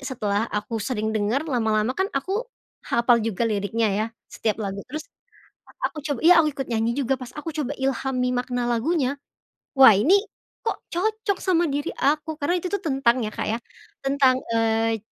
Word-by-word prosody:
setelah 225 -5 -1
aku 215 +2 -3
sering 220 -2 -2
denger, 220 +7 0
lama-lama 225 -4 +1
kan 380 +7 -1
aku 385 - -1 0.5
hafal 235 0 +3
juga 225 0 -1
liriknya 220 +1 0
ya, 215 +3 0 0.3
setiap 215 -2 -1
lagu. 200 0 -4
Terus, 305 +4 -5 0.6
a - - -16 0.2
aku 310 - -10
coba 285 -4 -3
iya 340 0 +8
aku 305 - +1
ikut 270 -2 -4
nyanyi 230 +1 +1
juga 270 -1 +1
pas 250 - -7
aku 300 +2 -4
coba 290 -3 -2
ilhami 265 -1 0
makna 245 0 -1
lagunya. 275 +3 0 0.6
Wah 260 -5 +9
ini, 285 - +5 0.5
kok 455 - 0 0.2
cocok 425 +1 0
sama 345 -2 +2
diri 290 +1 -2
aku. 300 +2 0
Karena 320 +5 +1
itu 365 - -3
tuh 405 - +1
tentang 265 -5 +2
ya 215 - -4
Kak - - -3
ya, 225 - 0 0.5
tentang, 270 -2 +4 0.2
eee, 225 0 +1
255 Hz, 175 wpm, -24 LUFS, 225-300 Hz, 0.6 s, Wah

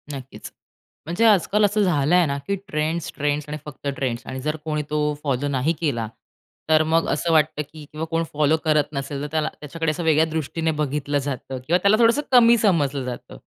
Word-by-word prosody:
नक्कीच. 135 -1 -9 0.5
म्हणजे 175 +8 +1
आज-काल 210 0 +4
असं 210 +1 +1
झालंय 175 0 +3
ना, 140 -2 -2
की 200 - +1
ट्रेंड्स, 160 -1 -2
ट्रेंड्स 145 0 -1
आणि 150 - -4
फक्त 145 -1 -8
ट्रेंड्स 125 -2 -3
आणि 130 - -5
जर 150 +3 -1
कोणी 150 -1 -1
तो 150 0 0
फॉलो 140 -1 -1
नाही 140 +3 0
केला, 120 -9 -1 0.6
तर 155 0 +5
मग 165 +1 +1
असं 165 +3 0
वाटतं, 155 -1 +2
की 150 +1 -11
किंवा 155 +1 -4
कोण 165 0 +1
फॉलो 150 +1 +3
करत 155 -1 +4
नसेल, 140 0 -4
तर 145 - -3
त्याला 155 -1 0
त्याच्याकडे 160 +2 -2
असं 155 +3 -4
वेगळ्या 160 -1 +4
दृष्टीने 160 +1 -1
बघितलं 145 0 -1
जातं 135 -1 -5
किंवा 170 +3 +4
त्याला 200 +2 +5
थोडंसं 235 +5 +4
कमी 235 -2 +7
समजलं 145 - +1
जातं. 125 -1 -7
150 Hz, 190 wpm, -23 LUFS, 145-165 Hz, 0.6 s, कमी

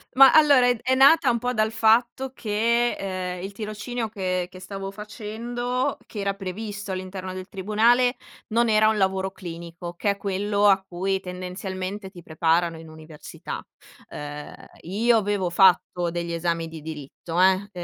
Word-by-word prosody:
Ma 270 0 +9
allora, 285 -5 +6
è 245 - +3
d - - -12
è 260 - +2
nata 275 +1 +6
un 235 - 0
pò 250 +1 -1
dal 215 -1 +1
fatto 240 +4 +2
che, 210 -5 -1
uhm, - - -7
il 195 - -5
tirocinio 215 +2 -5
che 185 -4 -2
che 185 0 -12
stavo 195 +1 -6
facendo, 230 +4 -3
che 210 - -8
era 200 0 -1
previsto 200 +1 -6
all'interno 185 0 -5
del 185 0 -7
tribunale, 230 +6 +2 0.4
non 235 0 +3
era 215 0 +5
un 220 - 0
lavoro 190 0 0
clinico, 170 -1 -8
che 200 +3 +1
è 200 - -4
quello 200 +1 +1
a 195 -1 +4
cui 190 +2 -1
tendenzialmente 185 +2 -6
ti 175 -3 -12
preparano 165 +1 +1
in 160 0 -11
università. 155 -1 -9 0.5
Uhm, 145 0 -7 0.3
io 225 +7 +2
avevo 200 -3 0
fatto 175 -1 +3
degli 170 0 -3
esami 165 -1 -1
di 160 -1 -9
diritto, 160 +3 -4
eh, 190 0 +6
uhm, 200 +2 -8
195 Hz, 165 wpm, -24 LUFS, 180-220 Hz, 0.5 s, Ma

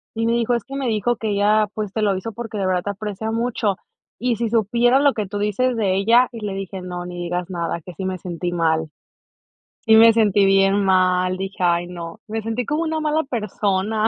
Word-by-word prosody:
Y 225 0 -1
me 230 - +2
dijo, 235 +1 +1
es 235 - -3
que 275 - -8
me 275 -2 -2
dijo 225 +2 0
que 220 - -3
ella, 210 +1 +3
pues, 210 -3 -4
te 220 - -1
lo 195 -2 +2
hizo 220 +3 -6
porque, 225 -1 -6
de 195 - -1
verdad 180 -1 0
te - - -4
aprecia 210 +2 -5
mucho, 225 -4 -1 0.4
y 245 0 0
si 235 -2 -1
supieras 235 +4 +3
lo 285 - +4
que 215 - -2
tú 205 +2 -5
dices 230 +5 0
de 195 -4 +1
ella, 235 +6 +4
y 230 - -8
le 200 - -3
dije: 195 -1 -6
"No, 180 -1 -6
ni 180 - -7
digas 175 +1 -3
nada, 170 -1 -3
que 180 +2 -10
sí 190 - -6
me 185 -1 -2
sentí 175 0 -4
mal". 160 -2 0 1.0
Y 220 - +7
me 230 0 +8
sentí 205 -3 +3
bien 195 +1 +3
mal, 185 -1 +2
dije: 190 -1 -5
"Ay 175 0 +2
no, 175 +3 -8
me 220 +1 -3
sentí 225 +2 -2
como 300 +6 -1
una 320 -1 -1
mala 310 +1 +1
persona". 215 -3 -1
205 Hz, 230 wpm, -21 LUFS, 185-230 Hz, 1.0 s, me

